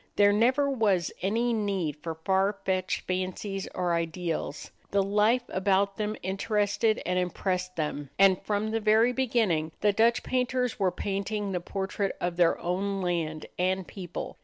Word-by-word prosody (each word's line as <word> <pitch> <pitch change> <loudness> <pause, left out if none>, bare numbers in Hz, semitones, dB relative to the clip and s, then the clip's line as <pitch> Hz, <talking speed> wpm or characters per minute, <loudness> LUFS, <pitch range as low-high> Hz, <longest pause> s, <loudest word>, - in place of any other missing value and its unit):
There 205 0 +5
never 255 +7 +3
was 210 - +1
any 230 +6 +1
need 195 -8 -1
for 165 0 -4
far 190 +5 +1
fetched 185 -1 0
fancies 185 +2 -3
or 180 -1 0
ideals. 165 -2 -3 0.2
The 200 0 +2
life 210 +5 +3
about 195 +1 +1
them 215 0 -2
interested 205 +3 +1
and 180 0 +1
impressed 185 0 -2
them, 150 -3 -3
and, 195 -1 +5
from 210 +1 -1
the 225 - 0
very 220 +3 +4
beginning, 220 -12 +1
the 205 -1 +3
Dutch 230 +3 +3
painters 250 -1 0
were 190 -2 +3
painting 200 +2 -3
the 180 - -1
portrait 195 +2 -3
of 175 -1 -2
their 175 -2 +4
own 195 +2 -2
land 160 -3 -2
and 185 +1 +1
people. 180 -3 -7
195 Hz, 155 wpm, -28 LUFS, 180-215 Hz, 0.2 s, There